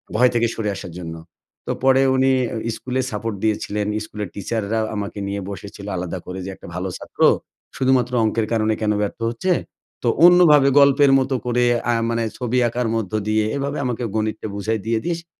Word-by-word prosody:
ভয় 125 Hz, +3 st, +5 dB
থেকে 115 Hz, 0 st, +3 dB
সরে 110 Hz, -2 st, -2 dB
আসার 90 Hz, -2 st, -8 dB
জন্য। 80 Hz, -1 st, -6 dB, 0.5 s
তো -, -, 0 dB
পরে 135 Hz, 0 st, +5 dB
উনি 130 Hz, 0 st, +3 dB, 0.2 s
অ্যা 115 Hz, 0 st, -3 dB
স্কুলে 130 Hz, 0 st, -2 dB
সাপোর্ট 105 Hz, +1 st, -3 dB
দিয়েছিলেন। 105 Hz, -1 st, -1 dB, 0.2 s
স্কুলের 105 Hz, -3 st, -6 dB
টিচাররা 110 Hz, +2 st, -2 dB, 0.2 s
আমাকে 100 Hz, 0 st, -4 dB
নিয়ে 100 Hz, 0 st, -3 dB
বসেছিলো 100 Hz, 0 st, -8 dB
আলাদা 90 Hz, +1 st, -4 dB
করে, 95 Hz, +1 st, -6 dB
যে -, -, -5 dB
একটা -, -, -13 dB
ভালো 90 Hz, +1 st, -3 dB
ছাত্র, -, -, -10 dB, 0.6 s
শুধুমাত্র 130 Hz, -2 st, +2 dB
অঙ্কের 110 Hz, 0 st, 0 dB
কারণে 110 Hz, -1 st, +2 dB
কেন 105 Hz, -, +1 dB
ব্যর্থ 105 Hz, +2 st, -3 dB
হচ্ছে? 120 Hz, +11 st, -1 dB, 0.5 s
তো -, -, 0 dB, 0.2 s
অন্যভাবে 165 Hz, -6 st, +7 dB
গল্পের 140 Hz, 0 st, +5 dB
মতো 130 Hz, 0 st, 0 dB
করে। 125 Hz, 0 st, +1 dB, 0.3 s
আ -, -, +4 dB, 0.2 s
মানে 115 Hz, 0 st, 0 dB
ছবি 125 Hz, 0 st, -1 dB
আঁকার 120 Hz, 0 st, -1 dB
মধ্য 110 Hz, -3 st, -2 dB, 0.2 s
দিয়ে, 110 Hz, 0 st, +2 dB
এভাবে 140 Hz, +1 st, -2 dB
আমাকে 125 Hz, -1 st, -2 dB
গণিতটা 110 Hz, 0 st, -2 dB
বুঝাই 110 Hz, +2 st, -1 dB
দিয়ে, 115 Hz, -1 st, +1 dB
দিয়ে, 170 Hz, -1 st, 0 dB
শে 170 Hz, -, -16 dB
115 Hz, 185 wpm, -21 LUFS, 105-130 Hz, 0.6 s, অন্যভাবে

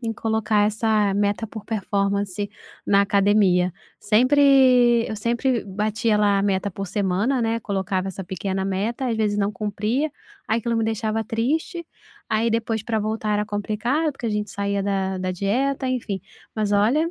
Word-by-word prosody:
em 230 Hz, -2 st, -2 dB
colocar 220 Hz, -1 st, +1 dB
essa 215 Hz, -1 st, +1 dB
meta 205 Hz, +2 st, 0 dB
por 220 Hz, -1 st, -9 dB
performance 200 Hz, -1 st, -1 dB, 0.4 s
na 200 Hz, 0 st, +4 dB
academia. 195 Hz, -3 st, +3 dB, 0.3 s
Sempre 250 Hz, 0 st, +5 dB
eu 220 Hz, -, -4 dB
sempre 235 Hz, +2 st, 0 dB
batia 210 Hz, +3 st, 0 dB
lá 205 Hz, -1 st, +3 dB
a -, -, 0 dB
meta 200 Hz, 0 st, 0 dB
por 195 Hz, +1 st, -5 dB
semana, 205 Hz, +7 st, 0 dB
né, 225 Hz, 0 st, 0 dB
colocava 190 Hz, -2 st, -2 dB
essa 190 Hz, 0 st, -6 dB
pequena 190 Hz, +1 st, -3 dB
meta, 210 Hz, +7 st, -2 dB
às 230 Hz, -, -1 dB
vezes 210 Hz, -2 st, 0 dB
não 200 Hz, 0 st, +1 dB
cumpria. 215 Hz, +8 st, -2 dB, 0.3 s
Aí 220 Hz, -, +1 dB
aquilo 235 Hz, +1 st, -1 dB
me 225 Hz, -, +1 dB
deixava 220 Hz, 0 st, -1 dB
triste, 305 Hz, -, -2 dB, 0.4 s
aí 220 Hz, +2 st, +1 dB
depois 225 Hz, 0 st, -1 dB
para 220 Hz, -2 st, -1 dB
voltar 215 Hz, 0 st, -2 dB
era 210 Hz, -, +1 dB
complicado, 220 Hz, +9 st, -1 dB
porque 250 Hz, -, -6 dB
a -, -, 0 dB
gente 210 Hz, -1 st, -2 dB
saía 200 Hz, 0 st, -1 dB
da 190 Hz, -1 st, -1 dB
da 185 Hz, 0 st, -2 dB
dieta, 260 Hz, +9 st, 0 dB
enfim. 230 Hz, -6 st, -2 dB, 0.3 s
Mas 215 Hz, -2 st, -1 dB
olha, 240 Hz, +12 st, +2 dB
215 Hz, 165 wpm, -23 LUFS, 200-230 Hz, 0.4 s, Sempre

